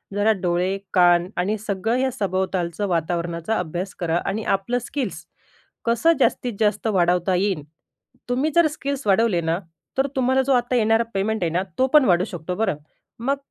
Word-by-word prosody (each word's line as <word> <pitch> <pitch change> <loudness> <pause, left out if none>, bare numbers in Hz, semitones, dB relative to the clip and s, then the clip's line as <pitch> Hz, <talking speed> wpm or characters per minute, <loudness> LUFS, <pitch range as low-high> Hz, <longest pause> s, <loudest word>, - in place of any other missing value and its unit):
जरा 205 +2 +3
डोळे, 180 +2 0 0.2
कान 175 -1 +5
आणि 195 +5 0
सगळं 210 +2 -2
हे 260 0 +1
सभोवतालचं 190 -3 -2
वातावरणाचा 170 +3 -1
अभ्यास 180 +2 -4
करा 170 -2 0
आणि 210 +3 -2
आपलं 195 +6 -2
स्किल्स, 220 - -4 0.6
कसं 235 +9 +3
जास्तीत 250 -2 +1
जास्त 210 0 +1
वाढवता 180 -2 +2
येईल, 185 -4 0 0.7
तुम्ही 265 +6 +1
जर 340 -2 +6
स्किल्स 280 -2 -4
वाढवले 200 -3 +3
ना, 165 +1 0 0.4
तर 270 +1 +2
तुम्हाला 260 0 +2
जो 275 - +3
आता 245 0 +1
येणारा 225 0 +3
पेमेंट 200 +1 -1
आहे 170 - +1
ना, 180 +3 0
तो 260 - +3
पण 300 -3 +7
वाढू 180 -4 +3
शकतो 180 -3 -5
बरं. 195 -6 0 0.4
मग 275 +4 0
200 Hz, 165 wpm, -22 LUFS, 175-240 Hz, 0.7 s, पण